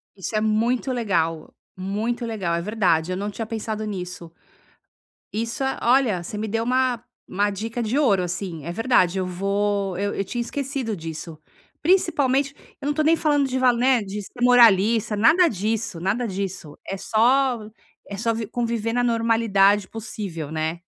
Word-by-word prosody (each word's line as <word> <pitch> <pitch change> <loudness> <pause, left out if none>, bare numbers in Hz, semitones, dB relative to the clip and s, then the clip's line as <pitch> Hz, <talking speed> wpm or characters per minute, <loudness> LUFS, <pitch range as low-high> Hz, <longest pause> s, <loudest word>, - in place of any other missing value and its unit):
Isso 195 +2 -5
é 215 - +2
muito 230 +4 +1
legal, 170 -10 -1 0.2
muito 215 +6 -2
legal, 195 -7 -2
é 170 - -1
verdade, 185 -5 +1
eu 185 - -2
não 205 +2 -3
tinha 220 +2 -5
pensado 215 -1 -4
nisso. 180 -4 -6 1.0
Isso 230 +6 -2
é 265 - -1
olha, 235 -8 +3
você 210 - -6
me 215 +1 -3
deu 225 +2 -1
uma 250 -1 +1 0.3
uma 205 +2 +1
dica 225 +4 -4
de 225 +5 -1
ouro, 200 -10 +3
assim, 175 -3 -5
é 170 - -3
verdade, 190 -4 +2
eu 185 - -1
vou 200 +1 -1
eu 205 0 -1
eu 195 - -2
tinha 240 +5 -3
esquecido 260 -2 -3
disso, 160 -1 -7 0.4
principalmente 285 -6 +2 0.3
eu 285 - -3
não 295 - +1
tô 310 - 0
nem 320 +2 +5
falando 290 -3 +2
de 260 0 -2
val, 250 -2 +4
né, 250 0 +3
de 205 0 -5
ser 245 - -12
moralista, 225 -3 +5
nada 310 - +5
disso, 215 - -2
nada 210 +7 -1
disso. 185 -6 -5
É 195 - -3
só 245 +4 +2 0.5
é 200 - -6
só 230 +2 0
vi 220 -2 -4
conviver 230 -2 -2
na 245 0 +1
normalidade 225 -4 +3
possível, 200 -9 -6
né. 160 +1 -2
215 Hz, 170 wpm, -23 LUFS, 190-240 Hz, 1.0 s, nem